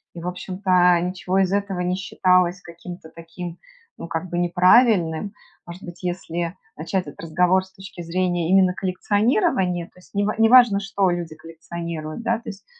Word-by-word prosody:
и, 170 - -7
в 175 - -5
общем-то, 180 -1 +2
ничего 185 +1 -2
из 190 -1 +2
этого 200 -2 -1
не 180 +1 0
считалось 185 -1 +1
каким-то 170 0 -11
таким, 170 +1 -8 0.4
ну, - - -7
как 165 +2 -4
бы, 175 - -3
неправильным. 180 0 +3 0.3
Может 175 +2 -10
быть, 175 0 -10
если 175 -1 -3 0.2
начать 180 +4 -2
этот 145 - -10
разговор 180 +3 +2
с 190 - -18
точки 190 -2 -11
зрения 175 0 -1
именно 190 -1 +4
коллекционирования, 190 - 0
то - - -22
есть 180 - -20
нева 205 +1 +1
неважно 225 -2 +6
что 195 -1 0
люди 170 -3 -4
коллекционируют, 165 0 -7
да, 230 0 +1
то 230 -1 -9
есть 195 -1 -11
180 Hz, 165 wpm, -22 LUFS, 170-195 Hz, 0.4 s, неважно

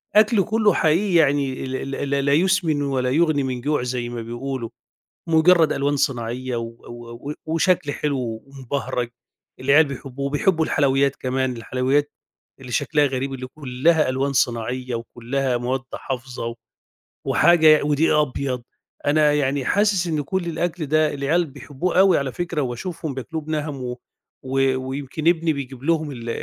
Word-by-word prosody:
وأكل 215 -2 +5
كلّه 215 0 +2
حقيقي 175 +5 +2
يعني 140 -4 +2
ال 130 0 -4
ال 140 - -3
ل 140 0 0
لا 140 - +3
يسمن 165 -3 +2
ولا 130 -2 0
يُغنِي 155 -1 +2
من 125 -2 -3
جوع 145 0 0
زي 125 -1 -3
ما 120 -1 -5
بيقولوا، 120 +1 -5 0.6
مجرّد 160 0 +5
ألوان 140 +1 0
صناعية 125 -2 -2
و 115 - -2 0.3
و 120 +3 -8
و 150 - -3
وشكل 165 -2 +1
حلو 125 -7 -2
ومبهرج 135 -2 -4 0.5
العيال 140 +4 +5
بيحبوه. 140 0 -5
وبيحبوا 160 +3 +1
الحلويّات 140 -2 +2
كمان 130 -1 -1
الحلويّات 130 +5 0 0.5
اللي 125 -2 -9
شكلها 150 +5 +2
غريب 135 0 -2
اللي 130 0 -6
كلّها 145 +3 +1
ألوان 135 +2 0
صناعية 125 0 -1
وكلّها 120 +3 -2
مواد 125 +2 -1
حافظة 125 -3 -5 0.7
وحاجة 160 -3 +5
ودقيق 150 +2 +2
أبيض. 135 -3 -1 0.4
أنا 150 0 +4
يعني 140 -2 0
حاسس 200 -3 +2
إن 155 -3 0
كل 175 +5 -2
الأكل 170 0 -2
ده 155 +1 +2
العيال 150 +5 +1
بيحبوه 145 +6 -2
أوي 190 -3 +6
على 135 -2 -2
فكرة، 170 -1 -2
وباشوفهم 145 +4 -4
بياكلوه 155 +5 -5
بِنَهَم 150 -3 -3
و 125 0 -4 0.5
و 135 0 +1
ويمكن 145 +4 -4
إبني 165 -2 +3
بيجيب 135 -2 -7
لهم 155 -2 0
ال 120 -2 -7
140 Hz, 150 wpm, -22 LUFS, 130-155 Hz, 0.7 s, أوي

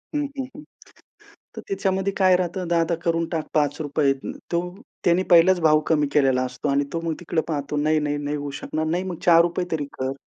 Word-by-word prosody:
हं, 295 - +1
हं, 265 -2 -3
हं. 295 - -10 0.9
तर - - -4
त्याच्यामध्ये 195 - -1
काय 185 -2 +5
राहतं, 180 0 -3
"दादा, 170 0 +1
करून 165 0 +1
टाक 160 -3 -3
₹5. 145 -1 +1 0.4
तो 170 - +2 0.4
त्याने 175 +2 +3
पहिलाच 175 +1 +6
भाव 155 -1 +4
कमी 150 -2 +2
केलेला 135 -3 +3
असतो 125 +3 -4
अन् 140 +1 +2
तो 165 - -2
मग 165 -1 -2
तिकडे 165 -1 -1
पाहतो, 145 -1 -3
"नाही, 155 +1 +2
नाही, 145 0 -1
नाही, 145 0 -3
होऊ 145 -1 -5
शकणार." 155 0 -3
"नाही, 175 +3 0
मग 180 -3 -5
₹4 170 +1 +4
तरी 150 -3 -1
कर. 130 +1 -1
160 Hz, 195 wpm, -23 LUFS, 145-175 Hz, 0.9 s, पहिलाच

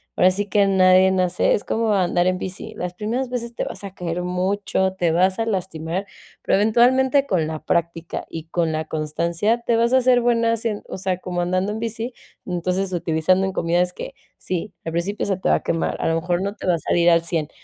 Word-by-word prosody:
ahora 185 - +5
sí 200 +2 -2
que 200 +1 +3
nadie 190 -1 +5
nace 185 -1 +2
es - - -1
como 225 -1 0
andar 180 -2 +2
en 185 0 +1
bici, 190 0 -6
las 180 0 -5
primeras 235 +6 -2
veces 240 -1 -4
te - - -3
vas - - -7
a 195 -2 -7
caer 180 -1 -4
mucho, 190 +1 0
te 175 -3 0
vas 185 +3 +2
a 225 - 0
lastimar, 185 -2 -3 0.3
pero - - +2
eventualmente 255 +6 +3
con 180 - +1
la 155 0 -4
práctica 170 0 -2
y 160 -1 -7
con 170 -2 0
la 155 0 -2
constancia, 170 +9 -1
te 235 0 +1
vas 235 +2 +2
a - - +7
hacer 250 -1 +4
buena 230 -1 +2
haciendo 225 -2 -2
o - - -5
sea, 185 -1 -2
como 180 -1 -3
andando 185 +3 0
en 215 - -4
bici, 230 +2 -4 0.3
entonces 185 +2 -1
utilizando 175 +2 +1
en 190 - -3
comidas 175 +1 +1
que - - -8 0.2
sí, 185 +3 -4
al 165 - -3
principio 180 +5 -2
se 195 -2 0
te 185 - -1
va - - +5
a - - -9
quemar, 165 0 -1
a - - 0
lo 165 - +2
mejor 175 +1 -1
no 200 +1 -3
te - - -8
va 180 - +3
a - - -4
salir 170 +2 +3
al 170 0 +4
100, 165 -3 -2
185 Hz, 225 wpm, -22 LUFS, 175-210 Hz, 0.3 s, a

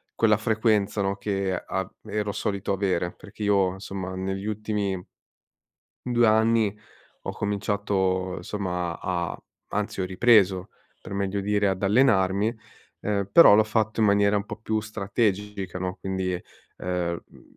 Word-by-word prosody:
quella 105 -2 +4
frequenza, 110 -2 +1
no, 100 0 -1
che 100 -2 -1
av 95 +1 -3 0.2
ero 105 -1 -2
solito 100 -1 -2
avere, 95 -3 0
perché 105 +1 -10
io, 100 -3 +3
insomma, 95 -1 -6
negli 95 +1 -3
ultimi 105 -3 -2 1.0
2 120 -1 +3
anni 110 -1 +3 0.5
ho - - -3
cominciato, 100 -3 -1
somma, 90 -4 -3
a 85 -2 -2 0.4
a - - 0
anzi 105 -2 -2
ho - - 0
ripreso 95 -1 +3 0.3
per - - -9
meglio 100 0 -1
dire 105 +1 +1
ad 95 -1 -2
allenarmi, 105 -1 +3 0.5
uhm, 100 -2 -1
però 165 -7 +9
l'ho 110 - +5
fatto 110 0 -1
in - - +5
maniera 100 0 +4
un 100 0 0
po' - - -7
più 110 0 -1
strategica, 105 -3 -2
no, 90 0 -3
quindi, 95 -1 -2 0.5
ehm, 90 -2 -2
mhmm, - - -18
100 Hz, 145 wpm, -26 LUFS, 95-105 Hz, 1.0 s, però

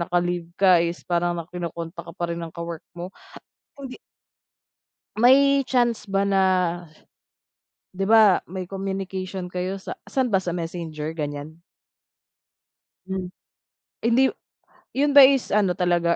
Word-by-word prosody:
naka-leave 175 -1 -1
ka 185 -3 +5
is 170 +1 -3
parang 175 0 0
na 170 - -4
kino-contact 170 -1 -6
ka 170 - -9
pa 170 -1 -2
rin 170 - -5
ng 165 - -5
ka-work 170 -1 -6 0.2
mo. 180 +3 -7 0.6
Hindi 270 -2 -9 1.2
May 275 +4 +5
chance 240 -4 +1
ba 195 0 0
na 195 -1 +3 1.5
'di 195 +1 -2
ba 220 -4 +6
may 185 -1 -5
communication 190 -1 -4
kayo, 180 +2 -4
sa 190 - -7 0.2
saan 265 -1 +1
ba 190 -1 +3
sa 180 - -3
messenger, 165 -2 -5
ganiyan? 150 +1 -6 1.4
Hmm, 190 -1 -4 0.7
hindi 245 +3 +4
yu - - -8 0.6
'yun 285 +1 +2
ba 280 - +11
is 270 -1 +4
ano 200 -3 +3
talaga, 175 -1 +1
180 Hz, 135 wpm, -23 LUFS, 170-200 Hz, 1.5 s, ba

